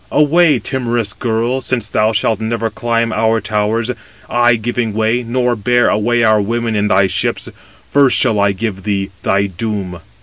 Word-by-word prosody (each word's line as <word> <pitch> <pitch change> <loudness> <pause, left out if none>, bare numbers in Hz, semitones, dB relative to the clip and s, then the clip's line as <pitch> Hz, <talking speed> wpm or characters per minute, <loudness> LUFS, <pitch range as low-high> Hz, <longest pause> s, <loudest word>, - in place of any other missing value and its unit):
Away! 150 0 +4
timorous 120 -5 -2
girl! 120 +4 -1
since 120 -4 -2
thou 110 +1 +1
shalt 110 0 0
never 115 0 -2
climb 115 -3 -1
our 110 +1 +1
towers, 110 +3 -1 0.4
I 120 0 +3
giving 115 0 -2
way, 110 +2 +1
nor 125 +1 0
bear 120 +3 +2
away 120 +2 +1
our 110 -1 +4
women 115 +2 -2
in 105 0 +1
thy 95 0 +3
ships; 95 - -2 0.4
first 140 -2 +4
shall 115 -5 +2
I 100 0 +3
give 100 0 -4
thee 100 -1 -2
thy 100 +1 +1
doom." 95 -2 -4
115 Hz, 165 wpm, -16 LUFS, 105-120 Hz, 0.4 s, Away